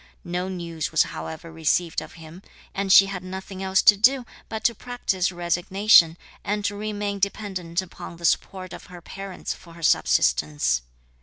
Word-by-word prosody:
No 180 +2 -3
news 170 -4 -4
was - - +4
however 80 - -7
received 165 +1 0
of - - -11
him, 165 +2 -12 0.3
and 195 -1 -1
she 195 - +9
had 195 -2 -6
nothing 190 +1 -7
else 190 0 +2
to 205 - +8
do 250 +5 +3 0.2
but 220 -1 -5
to 235 - +3
practise 205 -6 -2
resignation, 175 0 +4 0.3
and 205 0 -2
to 205 - -1
remain 205 -1 -3
dependent 190 -3 -2
upon 170 -1 -10
the 170 - -6
support 185 +1 0
of - - -10
her 180 -1 -11
parents 195 +2 -6
for 170 - -15
her 170 - -12
subsistence. 60 - +2
185 Hz, 165 wpm, -24 LUFS, 170-200 Hz, 0.3 s, she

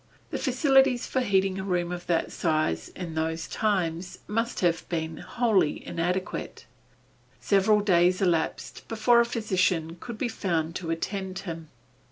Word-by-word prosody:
The - - -2
facilities 270 -2 +3
for 260 - -1
heating 195 -4 +1
a - - -3
room 180 -2 -1
of 175 0 -6
that 170 -2 0
size, 155 - 0
in 175 -3 -6
those 160 +1 -2
times 185 -4 -1
must 230 +3 -1
have 170 -2 +1
been 160 -2 -3
wholly 220 -10 +1
inadequate. 180 +3 -3 0.7
Several 210 +1 +3
days 180 -2 +3
elapsed 170 -4 -1
before 230 +2 +4
a 235 - +5
physician 185 -7 0
could 235 -2 -7
be 245 - -1
found 170 -7 -2
to 170 -3 -6
attend 190 +3 -3
him. 165 -3 -6
185 Hz, 145 wpm, -27 LUFS, 165-215 Hz, 0.7 s, a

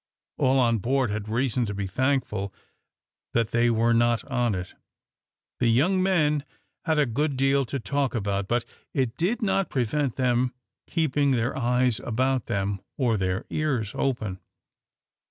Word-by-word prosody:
All 130 +1 +3
on 115 -3 +3
board 125 +2 +1
had 105 0 -4
reason 120 0 0
to 100 - -4
be 100 0 -2
thankful 105 -2 -1 0.8
that 115 -1 +1
they 120 0 +3
were 115 0 +3
not 120 0 +2
on 120 -5 0
it. 90 0 -6 0.9
The 120 - +2
young 160 +12 +3
men 155 -6 +2 0.4
had 160 -2 +1
a 150 - +4
good 140 +3 -1
deal 135 +1 +3
to 135 +3 -3
talk 140 +1 -1
about; 100 -2 -1
but 120 +2 0 0.3
it 130 -4 0
did 195 - 0
not 195 -2 +1
prevent 130 +1 0
them 125 -1 +1 0.3
keeping 150 -4 +1
their 125 -1 +1
eyes 125 -2 +1
about 130 +2 0
them, 100 0 -1 0.2
or 120 -5 +2
their 95 -2 -1
ears 130 -10 -1
open. 110 -8 -2
125 Hz, 155 wpm, -26 LUFS, 110-140 Hz, 0.9 s, a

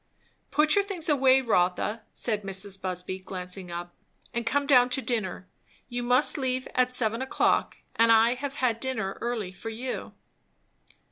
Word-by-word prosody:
"Put 300 +2 +3
your 405 - +4
things 375 -5 -2
away, 265 -2 +5
Rotha," 210 0 +1
said 215 -3 -2
Mrs. 195 0 -3
Busby 185 0 -3
glancing 185 0 -6
up, 175 0 -6 0.4
"and 235 -1 -3
come 285 +3 +1
down 250 -3 +5
to 250 - -1
dinner. 190 -6 -3 0.4
You 245 0 -3
must 250 +5 +3
leave 255 -1 -1
at 255 0 +2
seven 230 -1 +1
o'clock, 265 - +1 0.2
and 230 0 +5
I 225 +1 +5
have 275 +2 -5
had 240 -5 0
dinner 225 -7 -3
early 230 -6 -3
for 190 +4 -8
you." 245 +3 -5
235 Hz, 155 wpm, -27 LUFS, 195-260 Hz, 0.4 s, away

